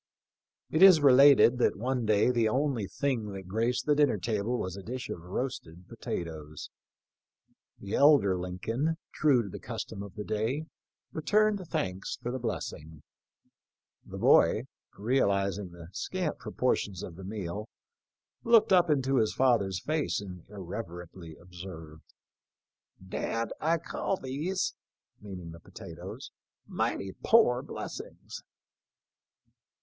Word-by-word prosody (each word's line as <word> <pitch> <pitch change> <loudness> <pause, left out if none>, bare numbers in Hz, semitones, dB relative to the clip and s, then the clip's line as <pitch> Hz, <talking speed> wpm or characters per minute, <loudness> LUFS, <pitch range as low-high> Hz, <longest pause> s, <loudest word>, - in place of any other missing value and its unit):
It 160 - +1
is 190 -4 +9
related 135 -2 +7
that - - +3
one 125 +1 -1
day 110 +3 +4
the 115 -3 +2
only 130 -4 0
thing 115 -7 -2
that 95 -1 -8
graced 115 +5 0
the 150 - +4
dinner 145 -6 +3
table 110 +3 -1
was 90 -4 -4
a 100 - -7
dish 125 +5 -6
of 85 - -5
roasted 90 -3 -5
potatoes. 80 -3 -6 1.1
The 100 0 -7
elder 140 -10 +5
Lincoln, 110 - -2 0.2
true 135 -6 +3
to 100 - -7
the - - -8
custom 100 - -6
of 100 -3 -9
the 105 - -5
day, 115 +9 -2 0.5
returned 210 +4 +2
thanks 95 -6 -3
for 120 - -4
the 130 - -3
blessing. 80 - -5 1.0
The - - -9
boy, - - +5 0.3
realizing 100 -4 +1
the 85 -1 -12
scant 180 - -3
proportions 105 -5 -1
of 85 - -8
the 95 - -10
meal, 100 +1 -5 0.7
looked 230 -4 +5
up 175 -2 +5
into 135 -2 +2
his 110 -3 +1
father's 105 -8 +2
face 155 -1 0
and 90 -4 -9
irreverently 90 -4 -8
observed, 85 -3 -11 0.6
" 95 - -23
Dad, 115 0 -2
I 165 +2 +2
call 180 +3 -3
these 155 +8 -2 0.2
" - - -65
— - - -44
meaning 90 -5 -8
the 85 - -11
potatoes - - -10
— - - -65
" - - -55
mighty 95 -1 -2
poor 215 - +5
bless - - -6
ings." - - -11
110 Hz, 140 wpm, -29 LUFS, 95-135 Hz, 1.1 s, is